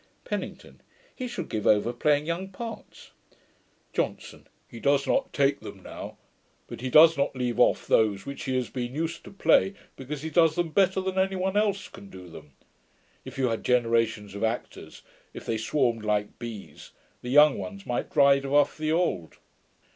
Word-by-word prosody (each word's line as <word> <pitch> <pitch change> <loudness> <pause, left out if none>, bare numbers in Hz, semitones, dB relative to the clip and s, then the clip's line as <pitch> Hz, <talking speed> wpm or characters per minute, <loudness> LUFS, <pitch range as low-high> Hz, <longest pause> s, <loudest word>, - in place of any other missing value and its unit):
PENNINGTON. - - -6 0.3
'He 255 - -4
should 190 -8 -5
give 110 -2 -3
over 110 +3 +3
playing 150 +1 +1
young 170 +4 -3
parts.' 225 +3 -9 0.8
JOHNSON. - - -4 0.2
'He 115 - -11
does 140 +4 +2
not 270 -1 0
take 140 0 +1
them - - -11
now; - - -9 0.5
but - - -9
he 130 - -3
does 160 +4 +7
not 140 - 0
leave 125 -2 -2
off - - +3
those 105 -3 +2
which 140 - -7
he 130 - -1
has 125 -2 -2
been 125 0 -4
used 165 +2 -3
to - - -9
play, 195 0 +3 0.2
because 140 +2 -7
he 160 - -4
does 165 0 +4
them 175 -2 0
better 190 +1 +2
than 190 0 -2
any 190 0 +1
one 190 +1 -1
else 205 -2 +1
can 100 - -13
do 90 -2 -11
them. 75 -3 -13 0.7
If - - -9
you 130 -2 +1
had 115 - -3
generations 115 -4 +1
of 100 - -5
actors, 115 +2 -4 0.3
if - - -8
they 110 - -2
swarmed 115 -1 0
like 105 0 -1
bees, 100 -10 -9 0.3
the 125 - -6
young 145 0 +6
ones 100 +1 -7
might 120 - -2
drive 140 -1 +4
off 145 +1 +3
the 155 0 -1
old. 160 - -1
135 Hz, 180 wpm, -27 LUFS, 115-165 Hz, 0.8 s, does